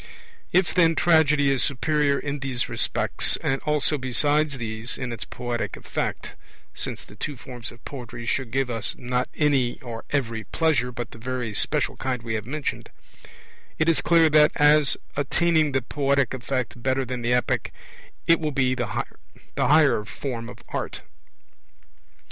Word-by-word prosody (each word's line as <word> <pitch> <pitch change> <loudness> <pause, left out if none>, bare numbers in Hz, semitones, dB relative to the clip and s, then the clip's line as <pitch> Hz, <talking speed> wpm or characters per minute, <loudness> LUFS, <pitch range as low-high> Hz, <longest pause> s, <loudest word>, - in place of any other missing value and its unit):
If, 185 0 +3
then, 165 -2 +4
Tragedy 150 -5 +4
is 135 -3 +1
superior 145 +1 +1
in 145 0 -3
these 130 -3 -2
respects, - - +1
and 135 0 0
also 150 0 +2
besides 145 +3 +1
these, 115 0 -5
in 125 -2 -4
its 115 - -6
poetic 120 -1 -4
effect - - -4 0.4
(since - - -4
the - - -15
two 145 -3 -5
forms 120 -3 -7
of 120 0 -17
poetry 120 -4 -7
should 130 +1 -1
give 135 +2 0
us, 115 -3 -2
not 125 0 -1
any 140 -5 +2
or 115 -2 -7
every 115 -6 -1
pleasure, 135 -1 +1
but 120 -1 -6
the 115 - -12
very 125 -2 -3
special - - 0
kind 125 -3 -2
we 115 -1 -3
have 110 0 -3
mentioned), 150 +2 -4 0.9
it 155 - +1
is 165 - +3
clear 165 -1 +5
that, 150 0 +6
as 150 0 +5 0.2
attaining 155 +2 +2
the 135 -2 0
poetic 140 -1 +1
effect 130 -1 -3
better 130 +1 0
than 125 0 -4
the 120 +1 +2
Epic, 125 - 0 0.5
it 165 0 +5
will 155 -2 -1
be 130 -2 +2
the 120 -3 -2 0.5
higher 140 -3 +4
form 115 +1 -5
of - - -12
art. - - -4
135 Hz, 160 wpm, -25 LUFS, 120-150 Hz, 0.9 s, that